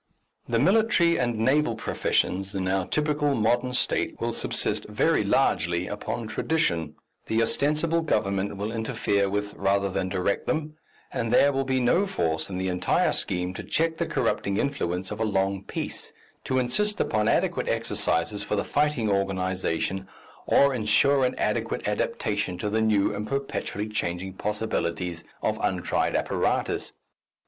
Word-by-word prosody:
The 115 - +2
military 180 - +3
and 120 -2 0
naval 130 +2 +2
professions 95 -3 -1
in 95 -1 -1
our 95 -1 0
typical 150 -1 +1
modern 120 +3 +1
State - - 0
will - - -1
subsist - - -1
very - - +2
largely 85 +1 +1
upon 110 +3 -4
tradition, 110 - 0 0.3
the 115 +1 +2
ostensible 155 +7 +1
government 100 -9 0
will 105 +2 -3
interfere 110 -3 0
with 105 +1 -2
rather 100 0 +1
than 95 0 -1
direct 95 +1 -1
them, 155 -1 -1 0.4
and 115 -1 -1
there 140 +3 +5
will 135 0 0
be 130 0 +1
no 170 +11 +3
force 80 - -1
in 90 - -4
the 95 0 -1
entire 90 -1 +1
scheme 90 0 -1
to - - -6
check 160 0 0
the - - -1
corrupting 100 0 0
influence 95 -10 -2
of 105 - -5
a - - +1
long 100 -2 0
peace, - - -5 0.3
to 130 - 0
insist 170 +13 +1
upon 110 0 +1
adequate - - +1
exercises 85 +6 0
for - - -2
the 100 - 0
fighting 145 -6 +1
organization 95 -1 -1 0.4
or 140 0 +5
ensure 130 +5 +3
an 125 - -1
adequate - - -1
adaptation 90 - -1
to 105 +3 -3
the 110 +1 +1
new 105 -2 +2
and 105 +1 -4
perpetually 135 -6 -3
changing 95 -3 -3
possibilities 90 -5 -2 0.2
of - - 0
untried - - 0
apparatus. - - 0
105 Hz, 150 wpm, -26 LUFS, 95-135 Hz, 0.4 s, there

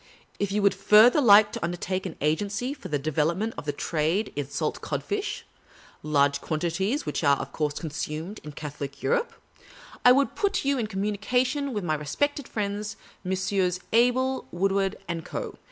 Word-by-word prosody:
If 200 -1 -1
you 205 0 0
would 200 - +5
further 215 +8 +6
like 210 -3 +7
to - - -5
undertake 175 +2 -2
an 170 - -8
agency 205 - 0
for 245 - -9
the 150 -4 0
development 160 +9 0
of - - -7
the 145 - 0
trade 160 +7 -1
in 145 -1 -3
salt 145 - -2
codfish 415 +1 -3 0.6
(large 140 -1 +2
quantities 175 - -1
of - - -15
which - - -2
are, 140 -1 +4
of - - -6
course, 150 -2 -1
consumed 160 +4 -5
in 150 -1 -8
Catholic 140 -2 -7
Europe), 485 0 +1 0.7
I 250 - +8
could 275 +2 +3
put 400 -7 0
you 280 -1 +2
into 215 -3 -2
communication 245 +8 0
with 210 -5 -3
my 160 -3 0
respected 270 - -1
friends, 205 0 -3 0.3
Messrs. 190 -1 0
Abel 255 +3 +2
Wood 190 +3 +1
ward 195 0 +1 0.2
& 165 -1 -4
Co. - - -6
195 Hz, 170 wpm, -26 LUFS, 155-235 Hz, 0.7 s, I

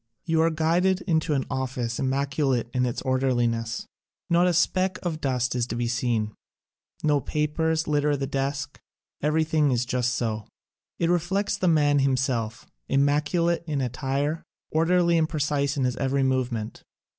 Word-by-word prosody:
You 160 -1 +2
are 165 - +4
guided 170 +4 +1
into 160 -4 +1
an 135 - 0
office 125 -3 -3
immaculate 135 -2 0
in 125 0 +1
its 120 - -4
orderliness. 120 -4 0 0.5
Not 175 +1 +4
a 180 - +2
speck 185 +2 +2
of 160 -3 -3
dust 125 -3 0
is 120 -1 -1
to 115 - -4
be 120 0 -1
seen. 115 -3 -1 0.7
No 150 -2 +3
papers 155 +3 0
litter 145 -1 +2
the 135 - -2
desk, 140 +1 -3 0.4
every 155 +2 +2
thing 150 -4 +2
just 125 0 0
so. 110 -3 -2 0.5
It 170 0 +1
reflects 190 +4 0
the 190 -1 -1
man 145 -3 +4
himself, 130 -4 0 0.2
immaculate 150 +5 +2
in 150 -3 -1
attire, 135 +4 -1 0.3
orderly 170 +1 +3
and 160 0 +1
precise 145 -2 0
in 135 - +1
his 125 -1 0
every 135 0 +1
movement. 125 -4 -1
140 Hz, 150 wpm, -25 LUFS, 125-160 Hz, 0.7 s, are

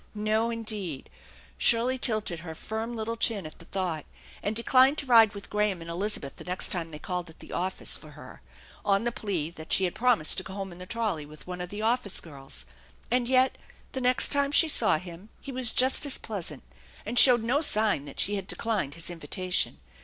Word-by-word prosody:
No, 215 +2 +1
indeed! 215 - -5 0.5
Shirley 245 +3 +3
tilted 215 -8 0
her 160 0 -8
firm 220 +6 -5
little 225 +1 -3
chin 220 -5 0
at 155 - -10
the 170 - -13
thought, 175 -5 -3 0.4
and 205 +2 -2
declined 260 +5 +5
to 290 - -2
ride 225 -5 +6
with 200 - -10
Graham 210 -3 +1
and 165 0 -7
Elizabeth 175 -5 -3
the - - -9
next 180 +1 -4
time 170 -3 -1
they 155 - -8
called 180 +1 -4
at 160 - -15
the - - -11
office 185 +1 -1
for - - -13
her, - - -12 0.4
on 200 +1 +2
the 240 - 0
plea 180 -9 -3
that 160 -2 -11
she 190 - +4
had 180 - 0
promised 230 -9 +3
to - - -6
go 190 - -9
home 195 -2 -5
in 175 - -12
the 180 - -9
trolley 205 -11 -2
with 155 0 -13
one 180 0 -6
of 180 - -5
the 205 +2 -5
office 230 -3 +2
girls. 135 - -8 0.5
And 245 -1 +2
yet 260 +1 +3 0.3
the 265 - -4
next 250 0 +2
time 280 0 +1
she 325 +3 +6
saw 290 - +5
him 175 +4 -10
he 275 - -8
was 255 -2 +2
just 260 +5 +4
as 275 - +2
pleasant, 175 - -6 0.4
and 240 +3 +2
showed 245 -4 +7
no 255 +6 +1
sign 215 - +2
that 140 - -9
she 205 - +2
had 190 -1 -6
declined 205 -13 -1
his 170 +1 -6
invitation. 175 - -1
205 Hz, 215 wpm, -28 LUFS, 175-235 Hz, 0.5 s, showed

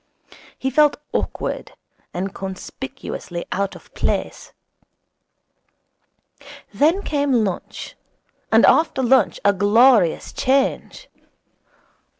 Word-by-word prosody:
He 265 - -2
felt 295 +2 +4 0.2
awkward - - -3 0.4
and 190 +2 -4
conspicuously 190 -1 -7
out 195 +1 -2
of - - -16
place. - - -3 2.2
Then 330 +8 +2
came 285 -2 -1
lunch 190 -3 -6 0.6
and - - +6
after 315 -4 +3
lunch 260 +2 +3
a 200 - +5
glorious 205 -1 +3
change. 270 +1 -1
260 Hz, 85 wpm, -21 LUFS, 195-280 Hz, 2.2 s, and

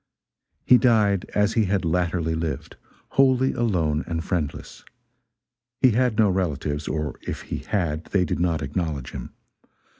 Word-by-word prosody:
He 125 - +7
died 105 -6 +3
as 105 +1 +2
he 110 -2 +2
had 95 -2 0
latterly 85 -1 0
lived 80 -1 -4 0.3
wholly 130 -1 +3
alone 85 -11 0
and 80 -1 -2
friendless. 85 -6 -4 1.0
He 130 - +5
had 120 -1 +1
no 110 -2 +5
relatives 75 -6 -1
or 75 -1 -3
if - - -5
he - - -5
had 85 -6 -2
they 95 -3 +1
did 80 - -2
not 85 -3 0
acknowledge 75 -2 -3
him. 65 -3 -8
90 Hz, 145 wpm, -24 LUFS, 80-105 Hz, 1.0 s, He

